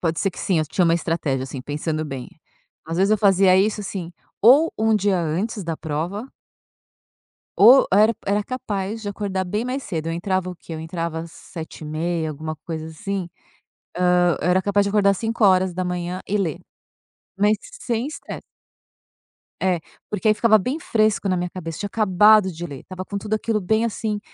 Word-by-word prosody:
pode 165 -2 -1
ser 195 - +1
que - - -13
sim, 185 -4 +1
eu 155 - +1
tinha 180 - +1
uma 165 - +4
estratégia 160 -6 -1
assim, 135 0 -7
pensando 155 +3 -3
bem, 135 -4 -6 0.6
às 165 +1 -4
vezes 195 +3 +3
eu 215 - +3
fazia 195 -2 +5
isso, 210 +2 +2
assim, 180 -4 -5 0.3
ou 280 +9 +6
um 220 0 +3
dia 200 -2 +1
antes 185 +7 -2
da 165 -1 -3
prova 165 - -4 1.3
ou 245 +7 +8
eu - - +5
era 215 +2 +5
era 205 +1 +1
capaz 215 -3 -4
de 210 - -6
acordar 195 -2 -3
bem 210 +5 -2
mais 255 +2 -3
cedo, 165 -4 -4
eu 165 - -1
entrava 185 +1 -1
o 180 - -7
quê? 165 - -10
Eu 160 - -5
entrava 165 0 -4
7h30, 160 0 -5
alguma 155 +1 -5
coisa 160 +1 -6
assim, 180 +3 -4 0.9
hã, 175 -4 +3
eu 175 - 0
era 185 +1 +3
capaz 200 0 +2
de 200 - -1
acordar 200 -1 +3
5h00 185 -4 +1
e 210 - +1
ler, 170 -7 -2 0.8
mas 210 +2 +3 0.2
sem 235 +1 -2
estresse. 305 - -8 1.2
É 185 -3 +2 0.3
porque 210 +1 -1
aí 215 - +6
ficava 215 +1 +5
bem 255 - -2
fresco 215 -6 +1
na 185 - +1
minha 175 0 -2
cabeça, 165 -3 -7
tinha 205 - -2
acabado 210 -1 +4
de 170 +1 -6
ler, 140 -5 -8
estava 185 0 -8
com 200 - -4
tudo 215 +1 -2
aquilo 215 -1 -1
bem, 220 +5 +1
assim, 215 -2 -2
190 Hz, 180 wpm, -22 LUFS, 165-210 Hz, 1.3 s, ou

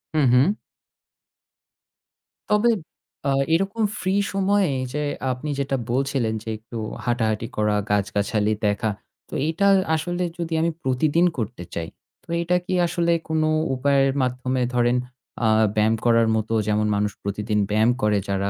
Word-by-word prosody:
হু, 155 - +3
হু। 140 +12 +4 1.9
তবে 210 +3 +4 0.6
আ 140 - +2 0.2
এইরকম 195 +6 0 0.2
free 190 +2 +1
সময়ে 195 +1 +2
এই 130 - -2
যে 150 - -1 0.3
আপনি 125 +4 -4
যেটা 135 0 0 0.2
বলছিলেন 135 -3 0
যে 115 - -6
একটু 115 +2 -9 0.3
হাঁটাহাঁটি 115 -2 0
করা, 105 -1 +2
গাছগাছালি 105 +1 +1
দেখা। 105 +2 +1 0.4
তো - - -13
এইটা 170 +5 +1 0.3
আসলে 175 +3 -2
যদি 170 -1 -3
আমি 170 +1 +1
প্রতিদিন 145 +6 +2
করতে 110 -5 -4
চাই, 85 -1 -3 0.4
তো - - -27
এটা 170 +1 +1
কি 185 - -3
আসলে 170 0 0 0.2
কোনো 160 -1 +1 0.3
উপায়ের 135 0 +2
মাধ্যমে 130 0 -1
ধরেন 120 0 +2 0.5
আ - - +4 0.3
ব্যায়াম 110 +1 +3
করার 115 -1 +4
মতো 110 +1 -1
যেমন 105 0 +1
মানুষ 105 0 0
প্রতিদিন 105 +1 -1
ব্যায়াম 110 +3 +3
করে 105 -1 +2
যারা 100 0 0
125 Hz, 145 wpm, -23 LUFS, 110-160 Hz, 1.9 s, হু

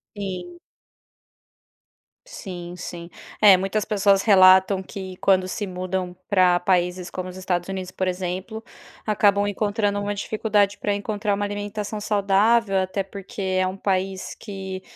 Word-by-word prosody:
Sim. 205 - -6 1.7
Sim, 175 -3 -8
sim, 170 -1 -7 0.3
é 205 -3 +8
muitas 195 +3 -1
pessoas 200 -2 +3
relatam 190 -1 +6
que 190 -1 -8
quando 185 -1 +2
se 200 +3 -4
mudam 185 0 -4
pra 180 -3 +4
paises 180 0 0
como 185 0 -5
os 185 - -10
Estados 180 -1 -2
Unidos, 185 -1 -5
por 185 0 -2
exemplo, 185 +4 -4 0.4
acabam 205 -1 +3
encontrando 205 0 -1
dificuldade 205 -1 0
pra 205 0 0
encontrar 205 0 -2
uma 205 0 -2
alimentação 205 +1 -4
saudável, 205 +1 +2
até 190 +1 -1
porque 195 +1 -9 0.2
é 185 - +1
um 185 +1 -5
país 190 -1 -2
que 190 -2 -6
195 Hz, 130 wpm, -23 LUFS, 185-205 Hz, 1.7 s, é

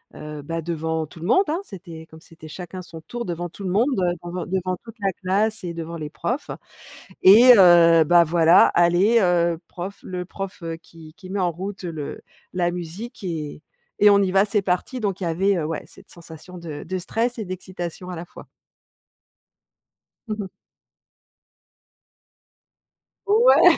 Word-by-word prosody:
heu, 150 -1 -8
bah, 165 +2 -4
devant 160 -1 -2
tout 165 - -14
le 170 - -6
monde, 380 - +4
hein. 330 +4 0
C'était 170 - -11
comme 160 0 -14
c'était 160 -1 -14
chacun 180 +3 -8
son 165 -2 -11
tour 240 +6 -6
devant 175 0 -4
tout 200 - -11
le 185 - -2
monde, 225 +8 +3
heu, 175 -1 +1
devant 175 +1 -5
devant 185 -1 -2
toute 225 0 -11
la 195 -1 0
classe 205 +3 -1
et 170 -1 -4
devant 165 0 -6
les 150 -1 -6
profs. 250 - -3 0.7
Et 235 +6 +9
heu, 170 -3 +7
bah 175 +1 +6
voilà, 165 +1 +5
allez, 175 +7 +4
heu, 170 -2 +2
prof 185 +3 -7
le 180 -1 -5
prof, 195 +1 -7
heu, 165 0 -4
qui 160 -2 -15
qui 185 -3 -13
met 200 - -2
en 175 -1 +1
route 190 +3 -7
le 160 -4 -6 0.3
la 175 -1 +1
musique 185 +7 -7
et 155 -4 -5 0.4
et 210 - +7
on 200 0 +5
y 190 -2 +1
va, 195 +2 +4
c'est 205 0 0
parti! 190 +8 -2
Donc 195 -2 -2
il - - -1
y - - -1
avait, 190 +4 +1
heu, 155 - -2
ouais, 160 0 -4
cette - - -17
sensation 170 +1 -12
de 155 -3 -7
de 185 +2 -4
stress 230 +6 -2
et 215 - -4
d'excitation 180 -1 -7
à - - -5
la 170 - -7
fois. - - -14 1.8
Mmh 215 - -2
mh. - - -6 2.8
Ouais. 460 +5 +6
180 Hz, 180 wpm, -23 LUFS, 165-195 Hz, 2.8 s, Et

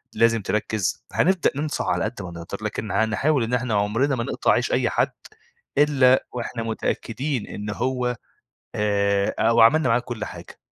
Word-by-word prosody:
لازم 115 -1 +3
تركز، 105 -1 -1
هنبدأ 185 0 +2
ننصح 150 +1 -2
على - - 0
قد 110 - -4
ما 90 -2 -7
نقدر، 85 +3 -7
لكن 110 0 -3
هنحاول 115 +5 +1
إن 115 +2 -3
إحنا 125 -2 0
عُمرنا 115 +7 +1
ما 115 - -2
نقطع - - 0
عيش - - +1
أي - - +2
حد، - - +1 0.7
إلّا 135 -3 +4
واحنا 120 -1 -4
متأكدين 120 +3 -3
إن 105 0 -6
هو 125 +2 -1 0.6
آآ، 100 -1 +1
أو 115 +1 +4
عملنا 130 +4 +5
معاه 115 +1 +4
كل 120 -3 -5
حاجة. 85 0 -10
115 Hz, 160 wpm, -23 LUFS, 105-130 Hz, 0.7 s, عملنا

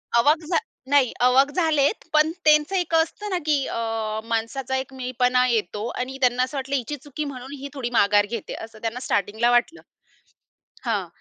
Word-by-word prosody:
आवाक 300 +7 +4
झा 335 - +3 0.3
नाही, 280 -4 +4
आवाक 255 +3 +5
झाले 315 -3 +2
आहेत, 285 +11 0
पण 305 +1 +4
त्यांचं 305 +5 +4
एक 355 -2 -1
असतं 330 +6 0
ना 370 - 0
की 290 -3 +2
अ, 225 -1 -2
माणसाचा 230 +4 -2
एक 265 0 -3
मीपणा 250 0 +1
येतो 215 -2 -1
आणि 255 +2 -4
त्यांना 250 0 +3
असं 265 +2 -4
वाटलं 275 +1 -2
हिची 270 +3 -2
चुकी 295 +1 -5
म्हणून 265 -1 -7
ही 280 0 -7
थोडी 255 -4 -3
माघार 205 -1 +4
घेते. 230 -3 -5
असं 225 -1 -9
त्यांना 230 +2 -3
स्टार्टिंगला 215 +4 +1
वाटलं 245 +8 +1 1.0
हां. 205 -6 -1
255 Hz, 175 wpm, -24 LUFS, 230-290 Hz, 1.0 s, आवाक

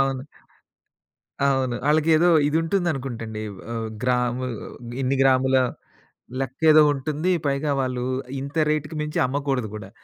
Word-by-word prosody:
అవును. 135 0 0 1.2
అవును. 130 -3 +1
ఆళ్ళకేదో 160 +2 +4 0.2
ఇదుంటుందనుకుంటండి. 135 - -1 0.3
ఆహ్, 115 -1 -3
గ్రాము 125 0 0 0.6
ఇన్ని 135 +1 +1
గ్రాముల 130 0 +4 0.9
లెక్కేదో 155 +4 +4
ఉంటుంది. 150 +6 -1
పైగా 140 +1 0
వాళ్ళు 125 -1 -2 0.4
ఇంత 140 +2 -7
రేట్‌కి 150 +1 -1
మించి 150 0 -2
అమ్మకూడదు 135 -4 -1
కూడా. 100 -2 -8
135 Hz, 100 wpm, -23 LUFS, 125-150 Hz, 1.2 s, ఆళ్ళకేదో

